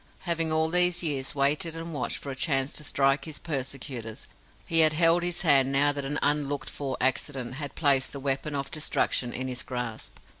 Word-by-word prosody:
Having 165 -2 -1
all 160 0 +1
these 180 0 +4
years 140 -4 -1
waited 150 +4 +1
and 165 0 -6
watched 135 -4 -2
for 140 - -7
a - - -6
chance 135 -1 0
to 150 - 0
strike 135 -1 +1
his 155 -2 -5
persecutors, 130 -6 -5 0.4
he 165 - +3
had 155 -1 +6
held 165 +2 +4
his 175 +1 -1
hand 135 -5 +4
now 145 +1 +4
that 140 -1 -4
an 145 +2 -1
unlooked 145 -1 0
for 135 -2 -4
accident 130 -1 -1
had 145 -1 -6
placed 140 -4 +3
the 140 - -7
weapon 140 +2 -2
of 140 -1 -4
destruction 130 -4 0
in 130 +2 -4
his 125 -1 -2
grasp. 125 -3 -6
140 Hz, 195 wpm, -27 LUFS, 135-160 Hz, 0.4 s, had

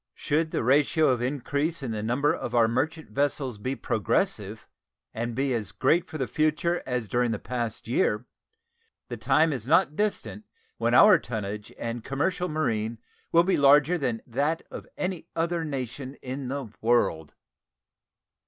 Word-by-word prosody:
Should 155 +2 0
the - - -2
ratio 145 +5 +3
of 125 -2 +1
increase 145 +4 -2
in 125 - -3
the 110 -1 -3
number 125 +7 +1
of - - -4
our 115 -1 +5
merchant 150 +7 -2
vessels 135 -5 -1
be 130 +6 -2
progressive, 105 -8 -1 0.5
and 115 +1 -3
be 135 0 0
as 105 -5 -3
great 175 - +2
for 155 - -5
the 130 -4 -2
future 155 +3 0
as 125 -3 -2
during 120 +4 +1
the 110 - -1
past 120 -1 -4
year, 115 -1 +1 0.8
the - - -5
time 160 0 +3
is 125 -3 -6
not 155 0 +3
distant 210 +1 -2 0.3
when - - +2
our 210 -5 +8
tonnage 105 -4 -5
and 115 0 -4
commercial 180 +6 -1
marine 115 -8 -1 0.3
will 170 0 +6
be 190 +2 +2
larger 145 +4 +5
than 125 -8 -2
that 145 +7 -1
of - - -8
any 185 -3 -3
other 170 0 0
nation 135 -2 -5
in 130 +1 -5
the 135 -4 -4
world. 110 -10 +1
135 Hz, 160 wpm, -27 LUFS, 115-155 Hz, 0.8 s, our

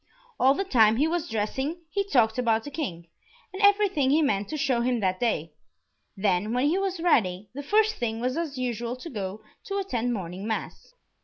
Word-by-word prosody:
All 265 +2 +5
the 390 - -1
time 225 - +4
he 290 +6 +2
was 340 0 -2
dressing 265 +10 -2
he 400 +4 0
talked 245 - +2
about 225 -2 +2
the 290 - -8
King, 180 - -5 0.5
and 380 - -5
everything 400 -9 +4
he 310 +3 +4
meant 205 -8 0
to 310 - -3
show 260 -4 +1
him 245 0 +1
that 185 -2 0
day; 165 -10 -1 0.6
then, 195 +2 +1
when 250 +2 +2
he 320 +6 +2
was 385 -2 -2
ready, 210 - +1
the 285 - -5
first 435 +8 +2
thing 225 -2 -2
was 255 +2 -1
as 315 -4 -3
usual 240 -1 -2
to 295 +6 -9
go 200 -2 -5 0.2
to 395 - -3
attend 245 - -1
morning 190 -2 -5
mass. 225 - -5
250 Hz, 200 wpm, -26 LUFS, 215-320 Hz, 0.6 s, All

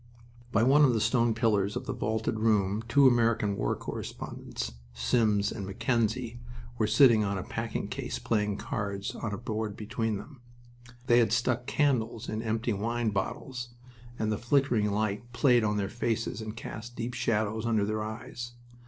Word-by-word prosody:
By 110 0 +3
one 140 +4 +6
of 130 -4 +5
the - - +2
stone 115 0 +2
pillars 105 -3 +1
of - - -4
the - - -2
vaulted 110 0 -1
room 105 -2 +2
two 140 +3 +6
American 115 -4 +3
war - - 0
correspondents - - -6 0.2
Sims 100 - +2
and 105 - -5
Mackenzie 115 +4 -1 0.4
were 110 - +3
sitting 110 0 +6
on 100 -1 -1
a 95 - -3
packing - - -3
case - - -4
playing 105 -3 0
cards 100 -6 -3
on 110 - -4
a 100 - -3
board 110 -3 -3
between 110 0 -2
them. 130 +5 -11 0.6
They 120 -1 +5
had 115 -3 +3
stuck 125 +2 +1
candles 120 -7 +1
in 110 +1 -2
empty 115 +1 -1
wine 115 +2 -1
bottles, 120 +5 -4 0.4
and 110 0 0
the 105 - -1
flickering 120 -4 +2
light 105 +3 -2
played 125 -3 +4
on 105 -1 +1
their 100 -1 0
faces 115 0 -2
and 110 +1 -6
cast 115 +2 -7
deep 120 +1 -4
shadows 110 -2 0
under 110 -3 +2
their 110 +1 -1
eyes. 120 +2 -6
110 Hz, 170 wpm, -29 LUFS, 105-120 Hz, 0.6 s, one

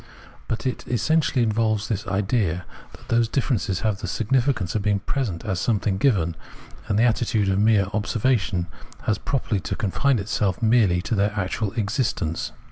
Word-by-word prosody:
But 115 - -3
it 130 - -2
essentially 130 +2 +2
involves 110 -1 +1
this 105 -3 -3
idea, 95 -2 0 0.3
that - - -16
those 115 0 +3
differences 115 -7 -1
have 105 -3 0
the 105 - -5
significance 120 -2 0
of 110 - 0
being 100 0 +2
present 115 -10 -2
as 95 -4 -1
something 105 -4 0
given, 95 - +2 0.5
and 100 - +1
the 110 - +4
attitude 110 -3 +2
of 95 0 +1
mere 105 -2 +4
observa 110 +5 +1
tion 90 -3 -2 0.4
has 110 - 0
properly 120 -6 -1
to - - -3
confine 125 +6 +1
itself 100 -2 -1
merely 110 -7 +3
to - - -2
their 105 0 +1
actual 100 +2 -2
existence. 110 - -1
110 Hz, 165 wpm, -24 LUFS, 95-120 Hz, 0.5 s, the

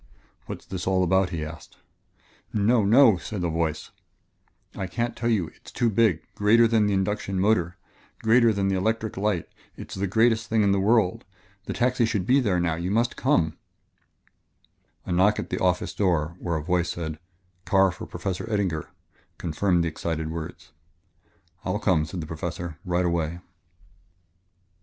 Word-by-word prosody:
"What's - - -7
this 95 -1 -5
all 95 -1 +2
about?" 95 +1 +2
he 80 -2 -4
asked. 80 +1 -11 0.7
"No 110 +2 +3
no!" 115 0 +6
said 95 +1 -5
a 85 - 0
voice; 80 -1 -2 0.8
"I 95 - -3
can't 120 +6 -2
tell 115 +1 -1
you 95 -8 +1
it - - -25
is - - -9
too 120 -2 +1
big 100 -7 +2
greater 115 +3 +4
than 110 -2 +3
the 100 - +1
induction 95 0 -1
motor 90 -4 +1 0.5
greater 115 +1 +5
than 100 -2 0
the 95 - +1
electric 110 +3 -1
light 100 -3 -1 0.3
it - - -10
is - - -6
the 100 - 0
greatest 110 +2 +2
thing 110 -1 +2
in 100 - +3
the 100 - +2
world. 105 -2 +2 0.4
The - - -3
taxi 125 -1 +2
should 105 -5 -1
be 130 +6 +4
there 100 -8 +1
now 85 -2 +1
you 85 +3 -3
must 115 +4 +1
come 85 - +1 0.7
" - - -42
A - - -5
knock 95 +4 +3
at - - -5
the - - -1
office - - +1
door 85 -5 0
where 85 -2 -2
a 75 - -4
voice 90 +1 0
said, 80 -2 -4 0.5
"Car 95 -1 +4
for - - -9
Professor 95 +3 -4
Eddinger," 95 -7 -1 0.5
confirmed 85 +1 +1
the - - 0
excited 80 0 -3
words. 80 -2 -7 0.9
"I'll 95 +2 -1
come," 90 -7 +1
said 90 +2 -5
the - - -5
Professor, 80 +1 -5
"right 90 -1 0
away." 85 -1 -1
95 Hz, 175 wpm, -25 LUFS, 85-110 Hz, 0.9 s, no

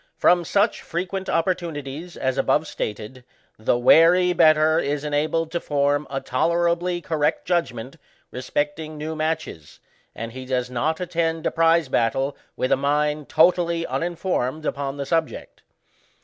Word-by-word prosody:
From 175 0 +4
such 200 +6 +1
frequent 185 +3 -4
opportu 175 0 0
nities 145 +4 -7
as 130 -1 -1
above 150 - +2
stated, 110 -3 -6 0.4
the 110 +2 +1
wary 170 +8 +5
better 155 -1 +4
is 145 -2 -2
enabled 155 +2 -1
to 170 - -1
form 145 -1 0
a 135 - -2
tolerably 170 +5 0
correct 155 -2 -1
judgment 135 -6 -2 0.3
respecting 150 +4 -3
new 155 +1 -4
matches, 155 - -4 0.4
and 115 +1 -6
he 130 +2 -8
does 125 -1 -1
not 155 +6 -1
attend 165 -2 -2
a - - +1
prize 165 -1 +3
battle 135 +3 0 0.2
with 130 - -1
a - - +6
mind 150 +1 0
totally 170 0 +3
uninformed 165 -4 -2
upon 140 -1 -3
the 140 - -3
subject. 165 +1 -3
155 Hz, 140 wpm, -23 LUFS, 135-170 Hz, 0.4 s, a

